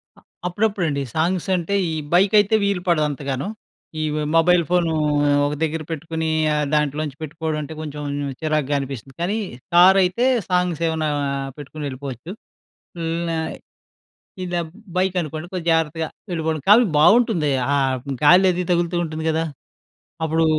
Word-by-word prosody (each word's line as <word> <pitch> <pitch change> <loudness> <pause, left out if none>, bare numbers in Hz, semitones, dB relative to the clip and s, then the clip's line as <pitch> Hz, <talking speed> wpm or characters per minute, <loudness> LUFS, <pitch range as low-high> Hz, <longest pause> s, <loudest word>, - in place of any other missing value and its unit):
అ - - -19 0.3
అప్పుడప్పుడండి. 180 -6 0
Songs 170 +3 0
అంటే, 180 +3 -1 0.2
ఈ - - -3 0.2
bike 190 +3 +4
అయితే 205 +2 +3
వీలుపడదు 180 -5 +1
అంతగాను. 140 +1 -3 0.5
ఈ - - 0 0.3
మొబైల్ 175 +1 +5
ఫోను 175 -2 +2 0.5
ఒక 145 - -1
దగ్గర 160 0 -1
పెట్టుకొని, 160 0 -3 0.3
ఆ - - +1 0.2
దాంట్లోంచి 150 -1 -1
పెట్టుకోవడం 155 +1 -3
అంటే, 155 +2 -7
కొంచెం 150 -1 -6 0.4
చిరాగ్గా 155 -2 0
అనిపిస్తుంది. 135 -2 -7
కానీ, 195 +6 0 0.4
కార్ 185 +2 +8
అయితే 185 +7 +1 0.2
సాంగ్స్ 180 -3 0
ఏమన్నా 160 -1 -1 0.5
పెట్టుకొని 145 0 -6
ఎళ్ళిపోవచ్చు. 135 +3 -7 0.7
ఇలానే, 165 0 -2 1.1
ఇదే 175 -1 -1 0.3
బైక్ 185 0 +1
అనుకోండి 155 0 -5
కొంచెం 180 -3 -5
జాగ్రత్తగా 160 0 0 0.3
ఎళ్ళిపోవండం. 160 -3 -2
కాని, 235 +3 +7
బాగుంటుంది. 200 -5 +4 0.2
ఆ - - +3 0.5
గాలి 180 +5 +7
అది 180 +1 -2
తగులుతూ 175 0 +1
ఉంటుంది 160 0 -5
గదా! 160 +1 0 0.8
అప్పుడు, 160 +1 +2
160 Hz, 130 wpm, -21 LUFS, 150-180 Hz, 1.1 s, కార్